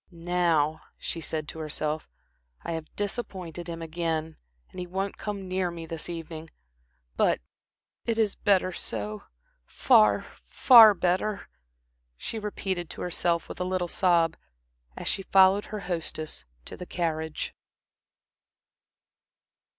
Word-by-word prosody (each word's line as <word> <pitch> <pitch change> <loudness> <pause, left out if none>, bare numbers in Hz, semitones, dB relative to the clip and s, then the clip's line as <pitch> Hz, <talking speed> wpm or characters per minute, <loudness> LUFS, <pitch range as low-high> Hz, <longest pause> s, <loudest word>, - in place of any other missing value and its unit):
"Now," 170 -3 +1 0.2
she 165 - -5
said 155 -1 -3
to 160 - -7
herself, 155 0 -3 0.5
"I - - -4
have 160 -1 -4
disappointed 190 -5 -4
him 165 0 -5
again 160 -1 -2 0.3
and - - -9
he 180 - -4
won't 190 +2 -2
come 200 -2 -4
near 185 -1 0
me 170 -1 -7
this 165 +1 -6
evening. 165 -1 -6 0.7
But - - +3 0.7
it 230 -1 +1
is 215 -3 +2
better 190 -2 +2
so 105 - -4 0.4
far, 105 -1 +4 0.2
far 225 - +8
better," 190 +4 0 0.7
she 225 - -4
repeated 190 -5 -3
to - - -8
herself, 170 -1 0
with - - -8
a - - +2
little 180 -1 -1
sob, 170 -2 +3 0.6
as - - -5
she 195 - 0
followed 195 +1 +5
her 210 -1 -6
hostess 160 - -4 0.2
to - - -7
the 180 - -8
carriage. 160 -2 -2
175 Hz, 125 wpm, -27 LUFS, 160-190 Hz, 0.7 s, far